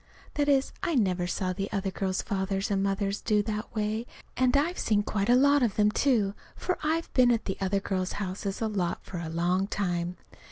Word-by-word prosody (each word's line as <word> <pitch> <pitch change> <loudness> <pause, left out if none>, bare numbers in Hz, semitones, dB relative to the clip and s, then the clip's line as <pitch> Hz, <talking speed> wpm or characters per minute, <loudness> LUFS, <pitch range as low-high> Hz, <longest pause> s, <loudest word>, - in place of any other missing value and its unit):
That 290 -1 +1
is, 275 -1 +3
I 335 - 0
never 185 -7 +1
saw 185 0 -1
the 195 +2 -4
other 195 -2 -1
girls' 190 -1 -1
fathers 195 0 -1
and 195 -1 +1
mothers 195 +1 -1
do 210 -2 +2
that 215 +1 -4
way; 215 +2 -1 0.3
and 255 +1 +3
I've 335 +5 0
seen 205 -2 +2
quite 205 +1 -1
a 245 - +7
lot 285 +2 +5
of 230 -5 +1
them, 210 0 +3
too, 215 -7 +2 0.2
for 365 - -2
I've 320 +2 -1
been 250 -2 +5
at 230 -2 +1
the 190 - -2
other 195 +1 +1
girls' 185 -2 -2
houses 195 +1 -4
a - - +1
lot 190 -5 -2
for 180 - -6
a 165 -1 -4
long 175 +4 +1
time. 175 -3 -2
200 Hz, 210 wpm, -28 LUFS, 190-240 Hz, 0.3 s, a